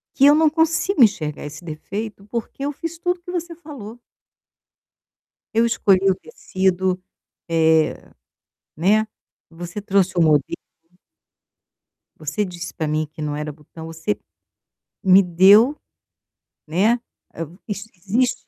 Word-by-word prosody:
que 275 - +5
eu 290 - +8
não 315 0 +4
consigo 320 0 +2
enxergar 155 -10 -1
esse 155 +4 -9
defeito 200 +6 -6
porque 235 +4 -4
eu 290 - -1
fiz 330 +3 -6
tudo 355 +1 -1
o - - -34
que 355 - -8
você 345 -1 -4
falou. 265 -9 -10 1.6
Eu 230 +1 +4
escolhi 195 -4 +3
o - - +3
tecido, 185 - -1 0.5
eh, 160 -1 +3 0.8
né, 210 +7 +2 0.4
você 175 +4 -7
trouxe 195 -2 +1
o - - +5
modelo 150 -3 +2 1.6
você 155 +7 -2
disse 175 -2 -7
para 160 -3 -2
mim 155 0 0
que 155 - -8
não 150 -1 -2
era 150 0 -4
botão, 160 +2 -12
você 160 -9 -3 0.9
me 190 +1 +7
deu, 200 - +6 0.9
né, 190 +9 +3 0.4
a 165 - -7 0.3
isso 205 0 -5
existe 230 +8 +1
195 Hz, 130 wpm, -21 LUFS, 165-240 Hz, 1.6 s, eu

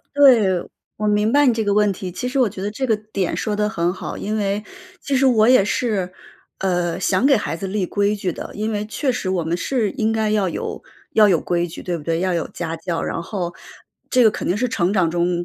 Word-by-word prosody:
对， 255 -8 +6 0.5
我 210 - -2
明 210 +1 +2
白 290 +1 +5
你 250 - +5
这 225 - 0
个 205 - +1
问 210 -1 +3
题。 185 0 -6
其 185 +8 -5
实 265 +2 -2
我 250 -5 +4
觉 190 -1 -8
得 205 - -2
这 260 +5 -3
个 220 - +2 0.2
点 190 -3 -1
说 215 -2 -2
得 210 0 0
很 175 -4 0
好， - - -6
因 215 +2 -3
为 205 0 -1 0.4
其 280 -4 -1
实 270 +1 +3
我 225 -3 +4
也 255 -6 +6
是， 205 -4 -1 0.5
呃， 175 -3 0
想 190 +5 +1
给 275 -2 +5
孩 185 -5 -3
子 195 - -5
立 195 -2 -1
规 205 +2 0
矩 190 -3 -2
的， - - -7
因 215 +2 -2
为 210 0 -2
确 255 +4 -1
实 190 - -3
我 180 -3 0
们 165 +2 -1
是 225 +2 -1
应 225 -5 0
该 220 -1 0
要 205 -3 +1
有 - - -5 0.3
要 215 -1 +6
有 175 -5 +3
规 175 -1 0
矩， 165 - -9
对 175 -1 -2
不 160 - -8
对？ 165 +2 -1
要 185 0 0
有 170 - -2
家 165 -1 -5
教。 165 0 -3
然 165 - -3
后 175 -1 -4 0.6
这 250 -2 +4
个 220 - +7
肯 - - -4
定 180 - +1
是 250 +3 0
成 180 -3 0
长 185 -5 +2
中 175 +1 0
205 Hz, 270 characters per minute, -21 LUFS, 180-220 Hz, 0.6 s, 个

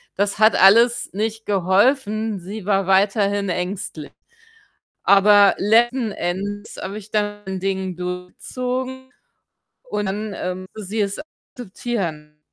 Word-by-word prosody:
Das 200 +1 -1
hat 215 +1 +5
alles 230 +5 +5
nicht 220 +2 -3
geholfen. 210 +2 +1
Sie 195 +3 -8
war 195 -2 +1
weiterhin 200 +1 +2
ängstlich. 180 -4 -4 1.0
Aber 200 0 +6
letzten 230 +2 +2
Endes 200 +4 -4
habe 195 +2 -5
ich 215 0 -10
dann 205 -1 -1
mein 190 -1 -5
Ding 190 -1 -2
durchgezogen 250 +9 -5 0.7
und 210 - -3
dann, 210 +2 -3
ähm, 185 +1 -5
muss 215 -3 -7
sie 215 +2 -2
es 200 -1 -1 0.4
akzeptieren. 185 -10 -5
205 Hz, 120 wpm, -21 LUFS, 190-220 Hz, 1.0 s, Aber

